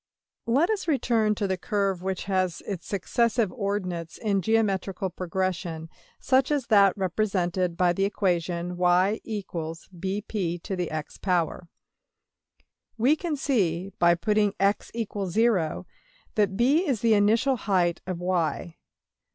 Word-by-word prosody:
} - - -66
Let 280 - +3
us 410 -5 -2
return 230 -8 +2
to 205 - -2
the 190 -1 -1
curve 195 -2 -1
which 190 0 -3
has 185 -3 -1
its 190 -5 -5
successive 225 +2 +1
ordinates 185 -7 -3
in 200 -3 0
geometrical 195 -3 0
progression, 175 -3 -3 0.3
such 260 0 +2
as 290 -4 0
that 200 -1 +6
represented 185 -2 -1
by 180 -1 +3
the 195 - 0
equation 175 -3 -1
$y=bp^x$. 180 -2 -2 1.3
We 255 +7 +4
can 325 -1 -3
see, 195 - 0
by 170 0 +5
putting 210 +3 +1
$x=0$, 200 -2 0 0.5
that 200 -3 +1
$b$ 285 +10 +3
is 255 -7 0
the 230 -1 +4
initial 225 +6 +3
height 180 -6 +1
of~$y$. 175 -2 -2
195 Hz, 110 wpm, -26 LUFS, 175-220 Hz, 1.3 s, that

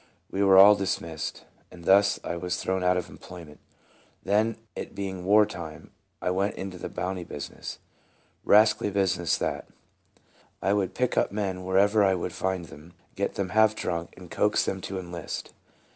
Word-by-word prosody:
We 95 - -1
were 95 -1 +6
all 100 +2 +10
dismissed, 85 -5 -3 0.2
and 85 -2 -13
thus 100 +1 +4
I - - -3
was 90 +1 -3
thrown 95 0 -1
out 90 0 +3
of 90 - -3
employment. 85 -5 -12 0.6
Then, 110 +2 +1 0.2
it - - -7
being 95 -2 -5
war 105 +2 +6
time, 80 -5 -9 0.3
I 90 - +1
went 95 +2 0
into 95 -2 -6
the - - -5
bounty 90 -1 -4
business. 75 -3 -7 0.7
Rascally 105 0 +4
business, 95 -3 +1
that. - - -3 0.9
I 100 - +1
would 95 -2 -1
pick 125 -1 0 0.2
men 100 -3 -2
up - - -9
wherever 100 +3 +3
I 95 -1 +3
could 90 0 -4
find 95 -2 -2
them, 80 +2 -14 0.2
get 100 - -2
them 95 -2 -2
half 110 +2 +4
drunk, 85 -4 -4
and 90 -2 -13
coax 105 0 +2
them 95 -1 -3
to 95 - -5
enlist. 85 -3 -6
95 Hz, 170 wpm, -27 LUFS, 90-100 Hz, 0.9 s, all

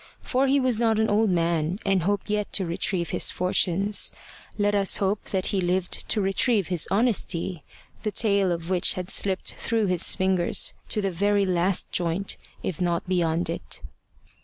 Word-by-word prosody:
For 265 +1 +1
he 275 +1 +3
was 255 -4 +1
not 225 -2 +2
an 220 0 +1
old 215 +1 +2
man, 170 -1 0
and 195 -2 +2
hoped 200 +3 -1
yet 210 -1 -2
to 190 - +1
retrieve 170 0 -1
his - - +2
fortunes. 190 +2 +1 0.5
Let 205 0 +1
us 200 -1 +3
hope 200 +1 -1
that 190 -2 -2
he 195 - +1
lived 180 +1 -1
to 215 - +2
retrieve 195 +1 +1
his 175 -4 +1
honesty, 190 -6 0 0.4
the 215 - -2
tail 200 -3 +1
of 170 +1 -4
which 180 -2 +2
had 185 0 -4
slipped 190 -2 0
through 225 -2 0
his 180 -2 +2
fingers 185 -2 +1 0.2
to 210 - 0
the 195 - 0
very 200 +3 +1
last 180 0 0
joint, 175 +3 -1 0.3
if 180 -1 -4
not 175 0 -1
beyond 175 -2 0
it. - - -4
190 Hz, 175 wpm, -25 LUFS, 175-205 Hz, 0.5 s, he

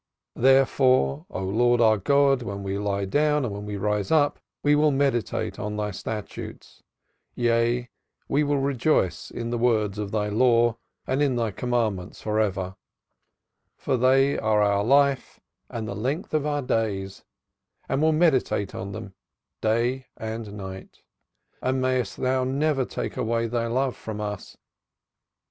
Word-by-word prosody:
Therefore, 130 - +3
O 95 - -4
Lord 120 +5 +2
our 110 -2 +4
God, 140 +4 +3
when 100 -4 -5
we 100 0 -2
lie 100 -1 -1
down 150 +6 +2
and 110 - -3
when 100 +1 -6
we 105 -1 -4
rise 105 0 -1
up 150 -2 +3 0.2
we 145 - +4
will 150 +1 +4
meditate 135 -4 0
on 105 0 -4
Thy 105 0 -2
statutes: 105 +2 -7 0.5
yea, 120 0 +1 0.4
we 145 +2 +2
will 145 0 +1
rejoice 135 - 0
in 115 0 -5
the 120 - -1
words 110 -4 +1
of 105 -1 -3
Thy 105 0 -1
Law 115 +1 +3 0.3
and 130 +2 0
in 140 -3 +2
Thy 115 -3 0
commandments 110 -5 -2
for 105 0 -1
ever, 95 -2 -1 1.0
for - - -1
they 135 +3 +3
are 105 -1 +2
our 100 0 +2
life 140 +2 +2 0.3
and 110 -2 -5
the 100 - -4
length 130 +12 -3
of 150 -1 +1
our 145 -1 -1
days, 100 -5 -2 0.6
and 135 - 0
will 160 0 +4
meditate 155 - +2
on 95 +1 -6
them 105 -3 -8 0.5
day 120 +4 0
and 110 -1 -5
night. 95 -1 -9 0.6
And 130 +1 0
mayest 130 -4 0
Thou 130 0 +1
never 135 +1 +1
take - - -5
away 115 0 0
Thy 115 0 -1
love 130 +2 0
from 110 -1 -7
us. 105 -1 -6
115 Hz, 155 wpm, -25 LUFS, 105-135 Hz, 1.0 s, our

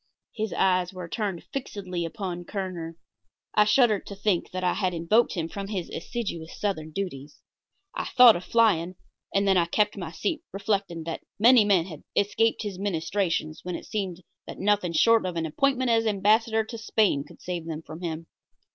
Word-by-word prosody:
His 220 -1 -3
eyes 185 -2 +2
were 180 -2 -7
turned 195 -2 -3
fixedly 190 -10 -4
upon 175 0 -5
Kerner. 175 -4 -5 0.6
I 210 - +5
shuddered 215 -1 +3
to 200 - -7
think 195 -3 0
that 185 0 -4
I 180 - +2
had 185 -3 -1
invoked 190 +9 +2
him 165 -2 -2
from 195 +3 -6
his 195 -4 -4
assiduous 170 -6 -5
southern 175 -7 -2
duties. 150 -5 -5 0.6
I - - -3
thought 250 -3 +7
of 175 - -4
flying, 185 -7 +2 0.4
and 200 0 +1
then 190 -1 +4
I 170 - +4
kept 210 +5 +1
my 170 -4 -5
seat, 315 - -2
reflecting 195 -4 -2
that 165 0 -5 0.2
many 235 +1 +6
men 190 -5 +3
had 155 -5 -9
escaped 225 +3 +2
his 200 -3 -5
ministrations 170 -3 -1
when 180 -1 -4
it - - -7
seemed 185 -4 -4 0.2
that - - -8
nothing 200 -3 +1
short 230 +7 +5
of 180 -2 -3
an 165 -1 -1
appointment 260 - +1
as 225 -1 +3
Ambassador 220 +2 +3
to 230 +1 -8
Spain 205 -9 +2
could - - -16
save 175 -2 -5
them 160 -1 -5
from 160 +2 -10
him. 165 -1 -4
190 Hz, 180 wpm, -26 LUFS, 170-215 Hz, 0.6 s, thought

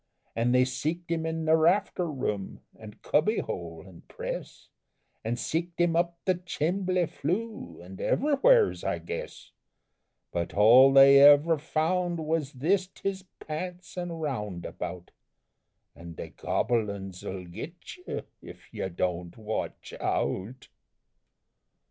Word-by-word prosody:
An' 115 +1 +1
they 125 0 +5
seeked 155 +7 -3
him 160 -1 -1
in 160 0 -3
the 160 0 +5
rafter 175 +1 +2
room, 105 -9 -4
and 105 -1 -13
cubby 210 +10 +2
hole 85 -2 -5
and 90 -3 -15
press, - - -7 0.6
An' 115 +2 -1
seeked 165 +7 -3
him 175 -1 +2
up 170 0 +1
the 185 - +3
chimbly 180 +1 -1
flue 175 - -4
an' 95 +1 -11
ever'wheres, 405 - +3
I - - -1
guess, 485 +2 -7 0.8
But 85 0 -3
all 120 +6 +7
they 135 0 +8
ever 145 +3 +7
found 170 +3 0
was 155 -2 -2
thist 180 +8 0
his 195 -1 -2
pants 175 +2 -6
an' 175 -1 -4
roundabout! 100 - -5 0.8
An' 85 -1 -10
the - - -7
gobble 115 -4 0
uns 95 -2 -7
'll 95 -1 -5
git 150 - -9
you 360 - -6 0.2
Ef - - -13
you 95 - -3
Don't 90 -1 -3
Watch 110 0 -5
Out! 115 +8 -2
155 Hz, 130 wpm, -28 LUFS, 105-175 Hz, 0.8 s, they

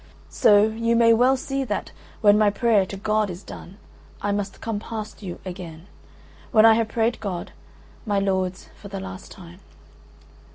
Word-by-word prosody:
So, 205 -1 +5
you 230 +2 0
may 230 0 +5
well 250 +4 +4
see 270 +1 -3
that, 210 -5 -4 0.3
when 205 -1 +6
my 210 -1 +4
prayer 210 -2 +2
to 195 - -7
God 215 +1 0
is 180 +2 -8
done, 190 +3 -11 0.4
I 205 - -1
must 200 -1 -3
come 225 -2 -3
past 220 0 -7
you 185 -4 -7
again: 175 -3 -8 0.7
when 220 -1 +6
I 225 - +8
have 225 0 +1
prayed 225 +2 0
God, 190 -5 -5 0.5
my 205 -2 -1
lords, 190 -2 -1
for 200 - -12
the 195 -1 -6
last 190 -1 -9
time. 175 0 -13
205 Hz, 170 wpm, -23 LUFS, 190-225 Hz, 0.7 s, I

